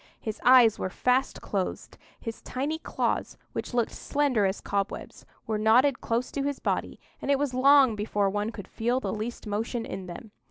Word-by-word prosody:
His 220 -2 -5
eyes 245 -3 +7
were - - -2
fast 250 +7 0
closed; 195 -3 -3 0.2
his 225 -2 -6
tiny 290 +5 -3
claws, - - -2 0.2
which - - -4
looked 240 -2 +1
slender 275 -8 +1
as 190 - -2
cobwebs, 200 -1 -4 0.2
were 215 -1 -1
knotted 250 +6 +4
close 235 +2 -1
to 280 - -2
his 280 0 -1
body, - - -2 0.2
and - - -4
it 280 - +4
was 280 -2 -1
long 265 -2 +6
before 205 -1 0
one 205 +2 -1
could 205 -4 -9
feel 240 +3 0
the - - -3
least 225 +3 -5
motion 225 +3 -2
in 190 -1 -6
them. 195 +5 -9
235 Hz, 185 wpm, -27 LUFS, 210-260 Hz, 0.2 s, eyes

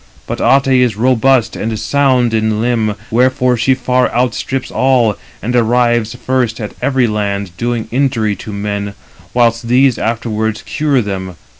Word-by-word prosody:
But - - -4
Ate 135 -1 +3
is 120 -5 +1
robust 130 +1 +2
and 110 0 -3
sound 130 -3 +1
in 110 -1 0
limb, 115 -3 0 0.2
wherefore 125 +1 +2
she 120 +3 +2
far 125 0 +1
outstrips 125 +2 -2
all, 125 -5 +2 0.3
and 125 +3 -1
arrives 120 -1 +2
first 125 -2 -1
at 105 -2 -5
every 130 -3 +2
land, 100 -4 -2
doing 120 +1 -2
injury 120 -5 0
to 110 - -8
men; 100 0 -4 0.4
whilst 115 -1 +2
these 130 +1 +3
afterwards 110 -1 -2
cure 145 -5 0
them. 95 -3 -5
120 Hz, 145 wpm, -15 LUFS, 110-130 Hz, 0.4 s, Ate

